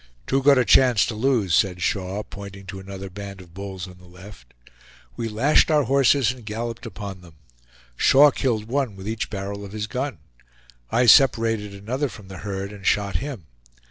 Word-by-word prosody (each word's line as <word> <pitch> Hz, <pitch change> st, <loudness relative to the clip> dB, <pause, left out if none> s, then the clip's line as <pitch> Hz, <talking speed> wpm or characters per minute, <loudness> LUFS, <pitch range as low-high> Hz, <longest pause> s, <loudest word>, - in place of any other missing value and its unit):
"Too 135 Hz, -, +1 dB
good 140 Hz, 0 st, +5 dB
a 125 Hz, -, +3 dB
chance 125 Hz, -6 st, +5 dB
to 115 Hz, -, -4 dB
lose," 110 Hz, -5 st, +1 dB
said 90 Hz, -2 st, +2 dB
Shaw, 95 Hz, +1 st, -2 dB
pointing 100 Hz, -1 st, -10 dB
to 95 Hz, +1 st, -7 dB
another 95 Hz, 0 st, -8 dB
band 100 Hz, +1 st, -8 dB
of 90 Hz, -2 st, -15 dB
bulls 95 Hz, -1 st, -7 dB
on 90 Hz, -1 st, -14 dB
the 90 Hz, -, -17 dB
left. 90 Hz, -8 st, -14 dB, 0.6 s
We 115 Hz, -1 st, -3 dB
lashed 125 Hz, +11 st, +3 dB
our 150 Hz, -2 st, +3 dB
horses 135 Hz, -2 st, +3 dB
and 125 Hz, -2 st, -11 dB
galloped 115 Hz, +2 st, -5 dB
upon 100 Hz, -3 st, -8 dB
them. 85 Hz, -3 st, -16 dB, 0.6 s
Shaw 145 Hz, +2 st, +6 dB
killed 115 Hz, -5 st, -1 dB
one 130 Hz, -4 st, -1 dB
with 95 Hz, +1 st, -9 dB
each 110 Hz, +1 st, -3 dB
barrel 100 Hz, 0 st, -5 dB
of 100 Hz, 0 st, -9 dB
his 110 Hz, 0 st, -3 dB
gun. 125 Hz, 0 st, -4 dB, 0.7 s
I 125 Hz, -, +3 dB
separated 115 Hz, -5 st, +4 dB
another 125 Hz, +8 st, -3 dB
from 100 Hz, -4 st, -13 dB
the 95 Hz, -, -9 dB
herd 100 Hz, -1 st, -5 dB
and 100 Hz, -2 st, -12 dB
shot 100 Hz, 0 st, +1 dB
him. 130 Hz, -, -6 dB
105 Hz, 185 wpm, -23 LUFS, 95-125 Hz, 0.7 s, Shaw